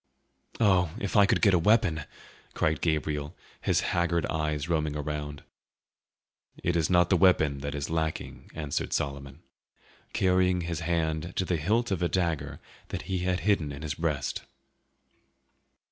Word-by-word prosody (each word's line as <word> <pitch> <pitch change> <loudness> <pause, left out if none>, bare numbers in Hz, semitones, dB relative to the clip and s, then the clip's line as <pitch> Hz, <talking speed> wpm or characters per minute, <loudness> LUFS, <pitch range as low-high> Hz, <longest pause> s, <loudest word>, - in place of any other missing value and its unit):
"Oh, 95 -7 +4
if 100 - -3
I 100 -2 +7
could - - +1
get 100 -3 +6
a 90 - +5
weapon!" 100 -6 +3 0.5
cried 80 -3 +1
Gabriel, 75 -2 -1 0.3
his - - +2
haggard 85 -2 +1
eyes 75 -1 -2
roaming 80 -3 0
around. 75 -1 -4 1.2
"It 85 - +1
is 80 -2 +1
not 90 0 +4
the - - +6
weapon 80 -6 +4
that 70 +1 -4
is 70 -1 -3
lacking," 80 -1 -3
answered 75 -3 -2
Solomon, 70 +1 -3 0.7
carrying 90 -1 +2
his 85 -2 -3
hand 80 0 -1
to 95 - 0
the 90 -1 0
hilt 110 +9 +1
of 95 -3 -1
a 85 - +1
dagger 85 -4 -1 0.3
that - - -5
he 95 -1 -2
had 90 0 0
hidden 100 -8 +1
in 70 +2 -8
his 75 -2 -2
breast. 75 -4 -2
80 Hz, 150 wpm, -28 LUFS, 75-90 Hz, 1.2 s, I